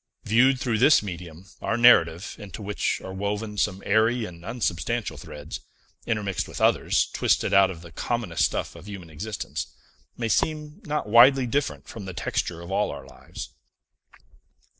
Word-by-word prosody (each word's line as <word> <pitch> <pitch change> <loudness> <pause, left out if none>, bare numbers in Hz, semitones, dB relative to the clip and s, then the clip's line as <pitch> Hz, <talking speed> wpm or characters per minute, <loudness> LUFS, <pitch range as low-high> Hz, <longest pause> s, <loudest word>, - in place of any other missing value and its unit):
Viewed 125 +4 +4
through 120 -4 0
this 135 -1 +6
medium, 90 -2 -8 0.2
our 110 - 0
narrative 85 -8 +5
into 105 0 -8
which 105 +1 -1
are 95 - -7
woven 105 +2 -3
some 95 +1 0
airy 110 +3 +2
and 85 -3 -10
unsubstantial 110 -2 -2
threads, 75 +2 -8 0.5
intermixed 100 -4 -1
with - - -7
others, - - +3
twisted - - +1
out 95 -1 +6
of 85 -3 -8
the 85 - -12
commonest 115 -4 0
stuff - - -3
of 85 +3 -12
human 95 -5 -9
existence 100 +7 -5 0.5
may 115 - -1
seem 150 +5 -1
not 150 -6 -2
widely 125 +4 +7
different 140 +4 -2
from 105 -4 -8
the 95 - -6
texture 85 0 -2
of 85 +2 -9
all 105 +2 +1
our 70 -2 -7
lives. - - -9
105 Hz, 160 wpm, -25 LUFS, 85-120 Hz, 0.5 s, widely